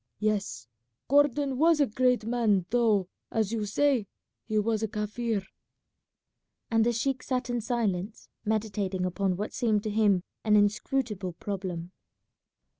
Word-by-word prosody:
Yes, 200 Hz, -, -1 dB, 0.4 s
Gordon 280 Hz, -1 st, +3 dB
was 325 Hz, 0 st, +5 dB
a 285 Hz, -, +5 dB
great 250 Hz, -1 st, +1 dB
man 225 Hz, -6 st, +2 dB
though, 220 Hz, -6 st, +3 dB, 0.2 s
as 220 Hz, -2 st, 0 dB
you 215 Hz, -2 st, -2 dB
say, 255 Hz, -1 st, +2 dB, 0.4 s
he 215 Hz, -1 st, 0 dB
was 215 Hz, +1 st, +1 dB
a 220 Hz, -, 0 dB
Kaffir;" 210 Hz, 0 st, -2 dB, 1.3 s
and 225 Hz, -1 st, +4 dB
the 240 Hz, -, +3 dB
sheik 260 Hz, +3 st, -1 dB
sat 250 Hz, -2 st, -2 dB
in 240 Hz, -1 st, -1 dB
silence, 215 Hz, -4 st, -2 dB, 0.2 s
meditating 205 Hz, -4 st, -1 dB
upon 185 Hz, 0 st, 0 dB
what 210 Hz, +2 st, -4 dB
seemed 215 Hz, -4 st, +1 dB
to 215 Hz, -, -2 dB
him 205 Hz, -4 st, +3 dB, 0.2 s
an 215 Hz, -1 st, +4 dB
inscrutable 210 Hz, -2 st, +1 dB
problem. 180 Hz, -2 st, -5 dB
215 Hz, 135 wpm, -28 LUFS, 200-240 Hz, 1.3 s, was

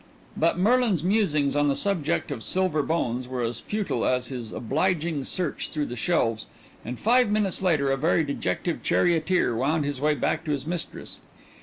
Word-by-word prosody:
But 165 Hz, +2 st, +1 dB
Merlin's 215 Hz, -, +2 dB
musings 155 Hz, -8 st, +2 dB
on 145 Hz, 0 st, +3 dB
the 140 Hz, -, +2 dB
subject 170 Hz, -4 st, 0 dB
of 130 Hz, -5 st, -4 dB
Silver 185 Hz, -5 st, +1 dB
Bones 130 Hz, -5 st, -1 dB
were 125 Hz, -1 st, -3 dB
as 115 Hz, 0 st, -2 dB
futile 210 Hz, -1 st, -2 dB
as 125 Hz, -1 st, +1 dB
his 120 Hz, -5 st, -5 dB
obliging 155 Hz, +3 st, -1 dB
search 175 Hz, -5 st, -2 dB
through 150 Hz, -1 st, -2 dB
the 120 Hz, -, -6 dB
shelves, 115 Hz, -6 st, 0 dB, 0.4 s
and 125 Hz, +2 st, -5 dB
five 245 Hz, -, +3 dB
minutes 210 Hz, -3 st, +1 dB
later 155 Hz, -7 st, +2 dB
a 135 Hz, -, +1 dB
very 160 Hz, +3 st, +2 dB
dejected 140 Hz, -, -2 dB
charioteer 170 Hz, -6 st, +2 dB
wound 145 Hz, +5 st, +1 dB
his 140 Hz, -2 st, -3 dB
way 150 Hz, 0 st, +2 dB
back 160 Hz, +2 st, -1 dB
to 155 Hz, -, -2 dB
his 140 Hz, -1 st, -3 dB
mistress. 170 Hz, +1 st, -5 dB
155 Hz, 175 wpm, -25 LUFS, 135-180 Hz, 0.4 s, on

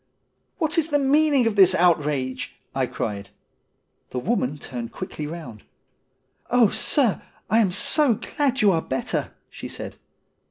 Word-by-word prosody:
' -, -, -48 dB
What 325 Hz, -1 st, +1 dB
is 325 Hz, 0 st, 0 dB
the 290 Hz, -, +3 dB
meaning 285 Hz, -1 st, +3 dB
of 225 Hz, -2 st, +1 dB
this 190 Hz, -2 st, +6 dB
outrage? 150 Hz, -7 st, +1 dB
' -, -, -45 dB
I -, -, 0 dB
cried. 100 Hz, -1 st, -4 dB, 0.8 s
The -, -, -6 dB
woman 145 Hz, -, -1 dB
turned 120 Hz, -5 st, -7 dB
quickly 155 Hz, -5 st, -6 dB
round. 150 Hz, -10 st, -8 dB, 0.5 s
' 130 Hz, 0 st, -42 dB
Oh, 240 Hz, -4 st, +5 dB
sir, 255 Hz, -3 st, +1 dB, 0.3 s
I 225 Hz, -, +5 dB
am 200 Hz, -5 st, +3 dB
so 250 Hz, -, +2 dB
glad 270 Hz, +3 st, -1 dB
you 205 Hz, -, +6 dB
are 165 Hz, -3 st, +1 dB
better,' 130 Hz, -, -3 dB, 0.2 s
she -, -, -8 dB
said. -, -, -7 dB
185 Hz, 160 wpm, -23 LUFS, -, 0.8 s, this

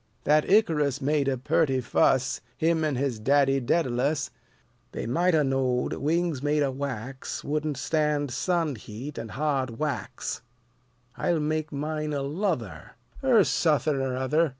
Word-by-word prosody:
That 150 Hz, +1 st, +3 dB
Icarus 150 Hz, -, +3 dB
Made 145 Hz, 0 st, +1 dB
a 135 Hz, -1 st, +1 dB
perty 130 Hz, +1 st, +1 dB
muss: 130 Hz, -1 st, +3 dB, 0.2 s
Him 160 Hz, 0 st, +2 dB
an' 150 Hz, -3 st, 0 dB
his 130 Hz, -3 st, -1 dB
daddy 135 Hz, +3 st, +3 dB
Dædalus 135 Hz, 0 st, 0 dB, 0.6 s
They -, -, -4 dB
might 170 Hz, +9 st, +2 dB
'a' 155 Hz, -, +4 dB
knowed 130 Hz, -2 st, 0 dB
wings 165 Hz, -1 st, 0 dB
made 150 Hz, +1 st, +2 dB
o' 135 Hz, -, 0 dB
wax 130 Hz, -1 st, -5 dB
Wouldn't 150 Hz, -1 st, -2 dB
stand 145 Hz, 0 st, 0 dB
sun 165 Hz, +2 st, 0 dB
heat 115 Hz, +7 st, -8 dB
an' 115 Hz, -1 st, -6 dB
hard 130 Hz, 0 st, -1 dB
whacks. 140 Hz, -8 st, -3 dB, 0.8 s
I'll 170 Hz, -2 st, +1 dB
make 155 Hz, 0 st, -1 dB
mine 150 Hz, +1 st, -3 dB
o' 140 Hz, -, -1 dB
luther, 140 Hz, -, -3 dB, 0.3 s
Ur 240 Hz, -6 st, +5 dB
suthin' 155 Hz, -4 st, +2 dB
ur 130 Hz, -1 st, -2 dB
other." 150 Hz, +5 st, +2 dB
145 Hz, 145 wpm, -27 LUFS, 130-155 Hz, 0.8 s, Ur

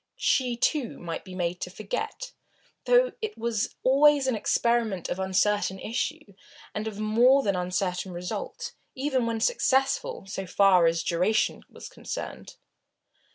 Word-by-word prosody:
She, 250 Hz, -3 st, +1 dB
too, 265 Hz, -1 st, 0 dB
might 170 Hz, -2 st, -6 dB
be 185 Hz, -2 st, -10 dB
made 180 Hz, -1 st, -2 dB
to -, -, -3 dB
forget, 215 Hz, -, -5 dB, 0.5 s
though -, -, +4 dB
it 435 Hz, -1 st, -4 dB
was 230 Hz, -1 st, -2 dB
always 280 Hz, +1 st, +5 dB
an 260 Hz, -3 st, +1 dB
experiment 220 Hz, -3 st, 0 dB
of 185 Hz, -, -3 dB
uncertain 190 Hz, +1 st, +1 dB
issue 215 Hz, -1 st, -4 dB, 0.4 s
and 215 Hz, +1 st, -3 dB
of 210 Hz, -2 st, -6 dB
more 240 Hz, +6 st, +4 dB
than 200 Hz, -2 st, +1 dB
uncertain 180 Hz, +1 st, -2 dB
result, 180 Hz, -, -5 dB, 0.2 s
even 260 Hz, -3 st, 0 dB
when 230 Hz, -1 st, -1 dB
successful, 270 Hz, -, +1 dB
so 195 Hz, -1 st, -5 dB
far 185 Hz, -2 st, +5 dB
as 165 Hz, 0 st, +1 dB
duration 185 Hz, +6 st, +1 dB
was -, -, -10 dB
concerned. -, -, -7 dB
215 Hz, 140 wpm, -27 LUFS, 185-260 Hz, 0.5 s, always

